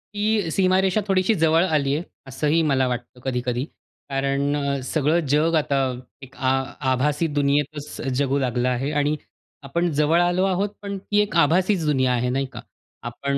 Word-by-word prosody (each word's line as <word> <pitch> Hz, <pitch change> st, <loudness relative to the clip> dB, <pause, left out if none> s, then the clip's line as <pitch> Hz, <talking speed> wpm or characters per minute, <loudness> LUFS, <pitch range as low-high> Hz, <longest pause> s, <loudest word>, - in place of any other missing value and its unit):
ती 210 Hz, -3 st, +1 dB
सीमारेषा 190 Hz, +3 st, +2 dB
थोडीशी 190 Hz, +2 st, +2 dB
जवळ 165 Hz, 0 st, +3 dB
आली 145 Hz, -5 st, +1 dB
आहे, 160 Hz, -, -2 dB, 0.2 s
असंही 150 Hz, +5 st, +1 dB
मला 135 Hz, -4 st, +2 dB
वाटतं 125 Hz, 0 st, -5 dB
कधी-कधी. 125 Hz, -1 st, -2 dB, 0.4 s
कारण 140 Hz, +1 st, 0 dB
अ, 140 Hz, -1 st, -1 dB
सगळं 155 Hz, +4 st, +1 dB
जग 155 Hz, +4 st, +2 dB
आता 145 Hz, -3 st, +1 dB, 0.4 s
एक 135 Hz, 0 st, -13 dB
आ 130 Hz, 0 st, +1 dB, 0.4 s
आभासी 145 Hz, +5 st, +1 dB
दुनियेतच 145 Hz, +1 st, -1 dB, 0.2 s
जगू 140 Hz, 0 st, +1 dB
लागलं 125 Hz, -1 st, 0 dB
आहे 130 Hz, +3 st, -1 dB
आणि 145 Hz, +1 st, +1 dB, 0.5 s
आपण 170 Hz, +5 st, -1 dB
जवळ 150 Hz, +3 st, +3 dB
आलो 175 Hz, +1 st, +2 dB
आहोत, 195 Hz, +2 st, 0 dB
पण 200 Hz, -1 st, -5 dB
ती 205 Hz, +2 st, -1 dB
एक 210 Hz, -1 st, -3 dB
आभासीच 180 Hz, +3 st, +2 dB
दुनिया 130 Hz, -4 st, +2 dB
आहे 125 Hz, 0 st, 0 dB
नाही 135 Hz, +2 st, 0 dB
का? -, -, -7 dB, 0.5 s
आपण 140 Hz, +3 st, -2 dB
145 Hz, 160 wpm, -23 LUFS, 135-175 Hz, 0.5 s, जवळ